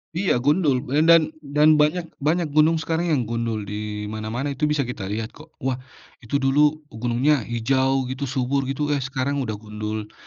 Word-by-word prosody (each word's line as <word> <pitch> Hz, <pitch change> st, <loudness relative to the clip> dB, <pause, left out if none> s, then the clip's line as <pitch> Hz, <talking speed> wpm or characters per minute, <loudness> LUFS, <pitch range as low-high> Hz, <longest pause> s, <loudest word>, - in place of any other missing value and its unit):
Iya 170 Hz, -9 st, +1 dB
gundul 145 Hz, -4 st, +2 dB, 0.2 s
dan 165 Hz, -2 st, +6 dB
dan 150 Hz, +1 st, +3 dB
banyak 150 Hz, +4 st, +2 dB, 0.2 s
banyak 155 Hz, +2 st, 0 dB
gunung 155 Hz, +2 st, +4 dB
sekarang 165 Hz, +1 st, -1 dB
yang 130 Hz, -, 0 dB
gundul 115 Hz, -1 st, -2 dB
di 105 Hz, +1 st, -5 dB
mana-mana 110 Hz, +6 st, -3 dB
itu 140 Hz, +2 st, 0 dB
bisa 150 Hz, -1 st, +1 dB
kita 115 Hz, -6 st, -5 dB
lihat 110 Hz, +3 st, -3 dB
kok 155 Hz, +1 st, -16 dB
wah 130 Hz, -1 st, -1 dB, 0.4 s
itu 120 Hz, +3 st, -5 dB
dulu 145 Hz, +3 st, +2 dB
gunungnya 120 Hz, +6 st, +1 dB
hijau 130 Hz, +3 st, +1 dB
gitu 135 Hz, +1 st, -3 dB
subur 130 Hz, +1 st, -1 dB
gitu, 145 Hz, +2 st, -1 dB
eh, 145 Hz, -, +1 dB
sekarang 140 Hz, +1 st, -2 dB
udah 110 Hz, -6 st, -2 dB
gundul 105 Hz, 0 st, -6 dB
135 Hz, 170 wpm, -23 LUFS, 115-150 Hz, 0.4 s, dan